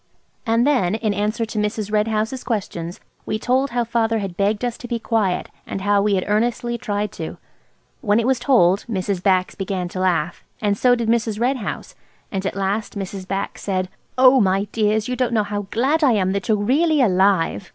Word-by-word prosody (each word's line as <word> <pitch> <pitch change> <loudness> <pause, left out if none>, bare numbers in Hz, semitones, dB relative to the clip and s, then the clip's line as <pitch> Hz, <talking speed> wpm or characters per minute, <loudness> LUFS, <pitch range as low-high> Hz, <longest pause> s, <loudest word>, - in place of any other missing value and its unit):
And 230 +2 +3
then, 240 -10 +2
in 220 -2 -1
answer 210 +3 -1
to 220 -1 -4
Mrs. 210 0 -2
Red 210 0 +2
House's 220 +4 -2
questions, 180 -7 -4 0.3
we 215 - -1
told 260 +5 +1
how 240 0 0
father 230 -1 0
had 195 -4 -4
begged 205 +4 0
us 240 -1 -2
to 245 - -7
be 240 -1 -1
quiet, 220 -5 0 0.2
and 195 - -4
how 205 0 +3
we 205 0 +2
had 185 - 0
earnestly 235 +3 0
tried 210 -3 -2
to. 160 - -6 0.6
When 210 -1 +2
it 230 - 0
was 260 -1 +2
told, 210 -8 +3
Mrs. 190 -3 -2
Bax 185 -1 +2
began 190 -2 -3
to 185 - -6
laugh, 175 -3 0 0.2
and 205 -1 +1
so 245 +4 +4
did 235 -2 -2
Mrs. 225 -2 +1
Red 255 +3 +1
House, 215 - -5 0.4
and 195 -2 -2
at - - -4
last 200 +2 -2
Mrs. 195 -1 -5
Bax 195 +1 -3
said– 185 -2 -1 0.3
"Oh, 255 0 +7
my 195 0 +2
dears! 215 0 +1
you 250 - -2
don't 250 -1 0
know 215 -2 +3
how 205 -1 -4
glad 280 +9 +1
I 265 -5 +5
am 190 -3 +1
that 200 +4 -2
you're 215 -2 +3
really 295 +9 +2
alive! 190 - +2
210 Hz, 205 wpm, -21 LUFS, 195-235 Hz, 0.6 s, Oh